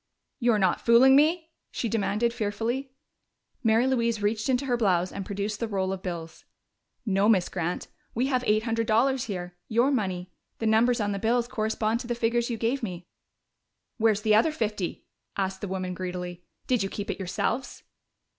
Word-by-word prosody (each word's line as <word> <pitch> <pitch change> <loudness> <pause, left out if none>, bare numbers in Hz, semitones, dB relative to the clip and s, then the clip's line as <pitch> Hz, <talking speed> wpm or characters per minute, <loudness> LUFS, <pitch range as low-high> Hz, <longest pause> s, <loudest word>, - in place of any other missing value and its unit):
"You're 235 -3 +3
not 190 -3 +2
fooling 245 +3 +6
me?" 320 +3 +3 0.2
she 235 - -3
demanded 225 +2 0
fearfully. 235 +4 -2 0.7
Mary 225 +1 +4
Louise 235 -4 +1
reached 215 +3 0
into 255 +1 +1
her 250 -2 +1
blouse 185 -6 +1
and 200 - -5
produced 205 +1 -3
the 230 - -1
roll 190 -2 -1
of 190 - -6
bills. 170 -3 -6 0.6
"No, 200 0 +2
Miss 190 -5 +3
Grant. 175 -1 -3 0.3
We 245 +3 +1
have 255 -2 0
eight 215 +1 +3
hundred 230 -1 -1
dollars 255 +4 +2
here 180 -5 -5
your 240 +5 +3
money! 185 -7 -2 0.3
The 225 - -3
numbers 230 +3 +3
on 205 -1 0
the 200 - -2
bills 235 +3 +1
correspond 220 -1 -1
to 240 - -7
the 240 - -1
figures 235 +1 0
you 235 - -2
gave 235 +5 0
me." 180 -6 -5 0.9
"Where's 215 -2 +3
the 215 -1 +4
other 225 +9 +4
fifty?" 210 - -3 0.3
asked 190 -1 -2
the 205 - -3
woman 185 -1 -3
greedily. 180 -1 -5 0.2
"Did 250 -4 +1
you 195 - -1
keep 205 0 -4
it - - -6
yourselves?" 195 +7 -2
220 Hz, 180 wpm, -27 LUFS, 195-240 Hz, 0.9 s, fooling